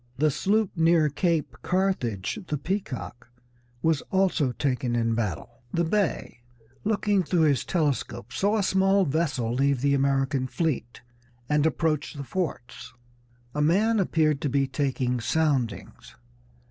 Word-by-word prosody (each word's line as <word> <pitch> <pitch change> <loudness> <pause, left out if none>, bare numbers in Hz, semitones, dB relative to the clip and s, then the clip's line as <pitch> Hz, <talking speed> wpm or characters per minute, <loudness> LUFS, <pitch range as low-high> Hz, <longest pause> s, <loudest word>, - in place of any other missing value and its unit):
The 150 +2 +3
sloop 205 +7 +1
near 165 -2 +4
Cape 165 +1 -1
Carthage, 180 - -1
the 150 - -1
Peacock, 135 - -5 0.5
was 160 -2 +2
also 185 -8 +2
taken 125 -2 -1
in 115 -1 +1
battle." 105 -9 -4
The 170 - +1
Bey, 175 - -1 0.4
looking 205 -2 +1
through 175 0 +1
his 145 -4 +3
telescope, 140 - -2
saw 200 +10 +1
a 205 - +1
small 190 +1 +3
vessel 135 -6 -1
leave 135 0 +1
the 140 0 +2
American 135 -1 +1
fleet 125 -3 -2 0.5
and 150 +2 +2
approach 155 -2 -1
the 140 - -5
forts. 125 -5 -5 0.6
A 150 - -1
man 205 +9 +3
appeared 155 -6 +1
to 145 - 0
be 140 0 +2
taking 130 -2 -1
soundings. 130 -1 -1
150 Hz, 135 wpm, -26 LUFS, 130-175 Hz, 0.6 s, near